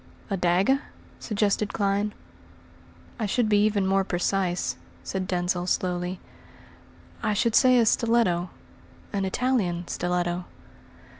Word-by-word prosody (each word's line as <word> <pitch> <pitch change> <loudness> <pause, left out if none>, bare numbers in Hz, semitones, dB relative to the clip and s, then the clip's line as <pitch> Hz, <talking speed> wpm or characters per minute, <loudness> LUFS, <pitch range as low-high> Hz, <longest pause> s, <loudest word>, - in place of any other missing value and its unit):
"A - - +2
dagger?" 190 +10 +2 0.4
suggested 210 -1 0
Clyne. 200 +1 0 1.1
"I 220 - 0
should 235 +3 +1
be 205 -1 +4
even 205 -2 +1
more 195 0 +2
precise," 180 0 -1 0.3
said 190 -1 -3
Denzil 180 0 -1
slowly. 180 0 -1 1.0
"I 215 - +1
should 230 +2 +1
say 255 0 +6
a 235 - +5
stiletto 220 -7 +2 0.6
an 195 -1 0
Italian 190 -6 0
stiletto." 175 0 -1
195 Hz, 115 wpm, -26 LUFS, 180-215 Hz, 1.1 s, say